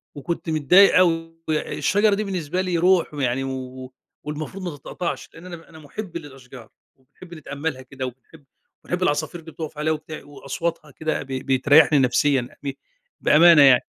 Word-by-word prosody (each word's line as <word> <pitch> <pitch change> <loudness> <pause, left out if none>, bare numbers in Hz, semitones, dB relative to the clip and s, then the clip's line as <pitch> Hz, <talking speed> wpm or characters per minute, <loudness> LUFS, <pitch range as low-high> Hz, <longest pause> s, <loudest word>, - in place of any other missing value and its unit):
وكنت 165 +3 -4
متضايق 170 +7 +5
أوي 165 -2 +2 0.2
الشجرة 200 +6 +1
دي 215 - -2
بالنسبة 180 -3 -2
لي 180 -2 -1
روح 180 -1 +3
يعني 135 -2 -1
و 130 -1 -7 0.3
والمفروض 155 +6 -6
ما 165 -5 -5
تتقطعش 170 +5 -5
لأن 165 +2 -13
أنا 170 -2 -10
أنا 160 -1 -14
مُحب 170 +4 -7
للأشجار، 135 -6 -12 0.3
وبنحب 170 +7 -16
أتأملها 145 -2 -5
كده 130 0 -7
وباحب 130 +5 -11 0.4
وبنحب 180 +1 -2
العصافير 155 +1 -1
اللي 160 0 -12
بتُقَفْ 155 -1 -7
عليها 155 +1 0
وبتع 155 0 -8
وأصواتها 150 +2 -5
كده 155 +3 -3
ب 140 - -18
بيتريحني 140 +3 +4
نفسيًا 130 0 +2
ب 140 - -2 0.5
بأمانة 165 0 +7
يعني. 135 -3 +6
155 Hz, 155 wpm, -23 LUFS, 135-170 Hz, 0.5 s, بأمانة